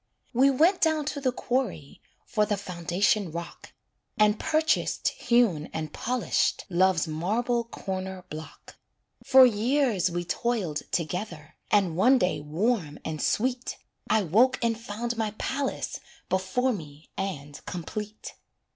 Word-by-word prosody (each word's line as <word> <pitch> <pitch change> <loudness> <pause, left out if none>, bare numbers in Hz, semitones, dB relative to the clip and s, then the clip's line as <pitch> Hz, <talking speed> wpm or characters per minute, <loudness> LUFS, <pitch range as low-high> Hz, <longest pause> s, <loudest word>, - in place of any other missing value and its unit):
We 260 +3 +5
went 325 +8 +3
down 315 -2 +2
to 285 - -6
the 260 -2 +2
quarry 240 - -3 0.2
For 215 -3 +1
the 205 - 0
foundation 185 +1 0
rock, 170 +1 -8 0.5
And 210 0 +4
purchased 315 0 +1
hewn 235 -11 +1
and 155 -1 -4
polished 250 -1 0
Love's 180 -2 +3
marble 225 +10 0
corner 190 -4 -5
block. 155 -1 -10 0.5
For 265 -1 +8
years 235 -4 +2
we 175 0 -3
toiled 200 -8 -2
together, 175 -2 -3 0.2
And 195 -6 +3
one 250 +9 +5
day 180 -6 +1
warm 165 +1 -1
and 155 -1 -3
sweet 250 +2 0 0.3
I 220 -1 +3
woke 230 +10 +4
and 230 -1 +2
found 235 +1 -4
my 215 -2 -2
palace 275 +1 -2 0.3
Before 190 +8 +1
me 155 -5 -10
and 145 -7 -5
complete. 210 +5 -6
205 Hz, 130 wpm, -27 LUFS, 170-245 Hz, 0.5 s, For